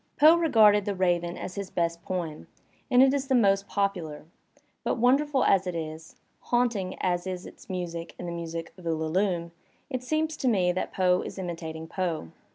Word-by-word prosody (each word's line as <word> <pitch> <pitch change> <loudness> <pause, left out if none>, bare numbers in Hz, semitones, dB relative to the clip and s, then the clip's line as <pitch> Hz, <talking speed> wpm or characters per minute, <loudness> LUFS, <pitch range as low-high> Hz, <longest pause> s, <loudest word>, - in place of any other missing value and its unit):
Poe 310 +3 +8
regarded 215 -11 +5
"The 205 - -1
Raven" 175 -2 0
as 185 - -6
his 200 -1 -5
best 170 -1 -1
poem, 170 -5 -4 0.4
and 250 -1 +6
it 270 0 +4
is 275 -1 -1
the 265 - +2
most 200 -4 +3
popular, 180 -8 -2 0.6
but - - 0
wonderful 270 +3 +3
as 190 -1 +3
it 180 - -3
is, 160 0 -6 0.2
haunting 230 -7 0
as 175 0 0
is 185 -1 -4
its - - -13
music 170 -2 -5
and 175 - -6
the - - -3
music 165 -1 -5
of 180 - -13
"Ulalume," 170 +2 0 0.4
it 255 -2 -2
seems 310 +4 -1
to 260 - -1
me 185 -7 +3
that 185 - -3
Poe 180 -1 +2
is - - -7
imitating 165 -3 -5
Poe. 165 - -3
185 Hz, 180 wpm, -27 LUFS, 170-225 Hz, 0.6 s, Poe